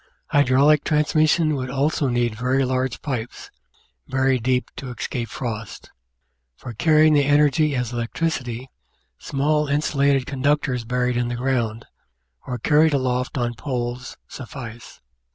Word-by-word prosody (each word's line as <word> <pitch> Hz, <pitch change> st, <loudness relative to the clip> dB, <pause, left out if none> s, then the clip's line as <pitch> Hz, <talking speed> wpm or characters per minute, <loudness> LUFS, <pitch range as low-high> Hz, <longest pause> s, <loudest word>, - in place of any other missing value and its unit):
Hydraulic 145 Hz, +2 st, +4 dB
transmission 155 Hz, +1 st, +2 dB
would 130 Hz, -2 st, -3 dB
also 140 Hz, +2 st, 0 dB
need 120 Hz, -2 st, 0 dB
very 130 Hz, +4 st, 0 dB
large 130 Hz, -1 st, -2 dB
pipes, 125 Hz, -5 st, -5 dB, 0.6 s
buried 130 Hz, -1 st, +1 dB
deep 125 Hz, 0 st, 0 dB
to 135 Hz, -, -7 dB
escape 120 Hz, 0 st, -4 dB
frost. 110 Hz, -4 st, -6 dB, 0.6 s
For 120 Hz, -, -9 dB
carrying 155 Hz, +5 st, +4 dB
the 145 Hz, -1 st, +4 dB
energy 145 Hz, +1 st, +3 dB
as 125 Hz, -2 st, -2 dB
electricity, 125 Hz, 0 st, -3 dB, 0.5 s
small 150 Hz, +2 st, 0 dB
insulated 140 Hz, -2 st, +1 dB
conductors 135 Hz, -2 st, 0 dB
buried 125 Hz, +1 st, 0 dB
in 120 Hz, 0 st, 0 dB
the 120 Hz, -, -3 dB
ground, 120 Hz, -3 st, -1 dB, 0.6 s
or 125 Hz, -, -3 dB
carried 150 Hz, +5 st, +3 dB
aloft 125 Hz, -1 st, -1 dB
on 120 Hz, -1 st, -1 dB
poles 125 Hz, 0 st, -4 dB
suffice. 120 Hz, -2 st, -9 dB
130 Hz, 125 wpm, -22 LUFS, 120-145 Hz, 0.6 s, Hydraulic